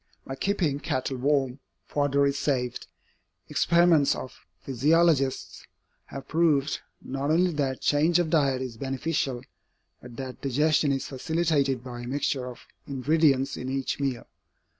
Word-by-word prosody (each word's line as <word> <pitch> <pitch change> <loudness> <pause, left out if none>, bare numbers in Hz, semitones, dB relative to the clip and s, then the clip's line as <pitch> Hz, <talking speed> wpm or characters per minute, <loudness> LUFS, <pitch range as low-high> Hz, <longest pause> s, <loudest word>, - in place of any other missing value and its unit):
By 135 - -5
keeping 160 -2 0
cattle 130 -2 -2
warm, 135 0 0 0.3
fodder 140 +1 +1
is 140 0 0
saved. 130 -4 -1 0.6
Experiments 170 -4 +4
of 130 - -7 0.2
physiologists 140 +1 +1 0.4
have 135 0 -9
proved, 155 -3 +2 0.2
not 135 +2 -3
only 175 +3 +3
that 140 -4 -2
change 155 +4 +3
of 170 -3 0
diet 135 -5 +2
is 120 -3 -7
beneficial, 135 -1 -2 0.6
but 120 -1 -11
that 130 -1 -7
digestion 145 +2 +2
is 135 -1 -1
facilitated 140 -3 0
by 120 -2 -7
a 120 - -7
mixture 135 -1 -1
of 125 - -9 0.3
ingredients 140 0 +2
in 130 - -5
each 135 +1 -2
meal. 135 -4 -2
140 Hz, 135 wpm, -27 LUFS, 130-155 Hz, 0.6 s, Experiments